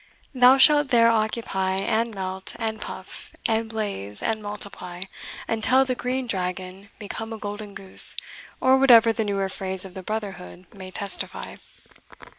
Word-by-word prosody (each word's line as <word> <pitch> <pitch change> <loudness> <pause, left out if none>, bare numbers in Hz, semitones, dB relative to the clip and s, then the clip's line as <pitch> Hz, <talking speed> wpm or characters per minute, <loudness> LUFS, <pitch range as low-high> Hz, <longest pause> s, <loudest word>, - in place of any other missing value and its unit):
Thou 255 +1 +6
shalt 290 0 +6
there 230 -2 +5
occupy, 215 -4 -1
and 220 +3 0
melt, 190 0 -4
and 220 -2 -3
puff, 185 - -7
and 225 0 0
blaze, 200 - -3
and 220 -1 -1
multiply, 200 -3 -6 0.4
until 255 +4 +3
the 255 - -1
Green 255 +1 -2
Dragon 185 -1 -4
become 225 +2 -6
a 225 - -5
golden 205 0 -7
goose, 190 -1 +4 0.4
or 260 +1 +4
whatever 235 -4 +7
the 220 - -1
newer 200 -2 -1
phrase 190 0 -2
of 190 - -10
the 190 - -7
brotherhood 195 -3 -6
may 190 -2 -9
testify." 200 +1 -5
210 Hz, 145 wpm, -24 LUFS, 190-230 Hz, 0.4 s, whatever